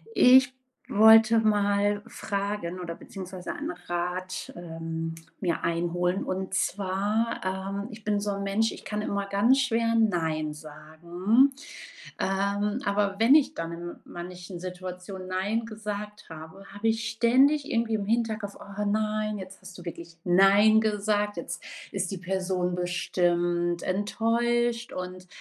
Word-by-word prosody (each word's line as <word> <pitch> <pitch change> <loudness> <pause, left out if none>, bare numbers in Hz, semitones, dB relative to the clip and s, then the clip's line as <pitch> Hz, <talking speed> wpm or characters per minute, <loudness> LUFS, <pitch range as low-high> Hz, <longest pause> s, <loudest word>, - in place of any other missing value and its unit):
Ich 260 +1 +7 0.4
wollte 220 +1 +7
mal 205 -1 +2
fragen 200 -3 -3
oder 170 -2 -5
beziehungsweise 185 +1 -7
einen - - -4
Rat, 180 +1 -4
ähm, 165 -1 -5 0.3
mir 175 -4 -1
einholen. 175 +2 0
Und 190 0 -3
zwar, 200 +4 0
ähm, 195 +2 -3
ich 215 -1 -11
bin 205 -1 +1
so 205 0 -2
'n 200 0 -3
Mensch, 205 +3 +1
ich - - -11
kann 210 0 -3
immer 200 -1 -2
ganz 220 +7 +3
schwer 230 -3 +1
nein 160 -8 +1
sagen. 170 - +1 0.7
Ähm, 200 +3 0
aber 200 -1 +1
wenn 230 +5 +6
ich 295 -1 +4
dann 165 0 -4
in 170 +1 -6
manchen 175 +1 -8
Situationen 185 +1 -7
nein 200 +5 -1
gesagt 210 -1 -6
habe, 160 +4 -10
habe 205 +3 -2
ich 225 0 0
ständig 265 +6 +3
irgendwie 230 -1 +1
im 205 -2 -2
Hinterkopf: 220 -2 -1
„Oh 205 +1 -5
nein, 215 0 0
jetzt 190 0 -9
hast 190 -1 -11
du 175 - -12
wirklich 170 0 -8
nein 195 +4 +6
gesagt, 210 -1 0
jetzt - - -6 0.3
ist 195 -2 -2
die 195 - -5
Person 185 -1 -1
bestimmt 175 -1 0
enttäuscht.“ 235 +4 0
Und 185 0 -6
200 Hz, 135 wpm, -27 LUFS, 180-215 Hz, 0.7 s, Ich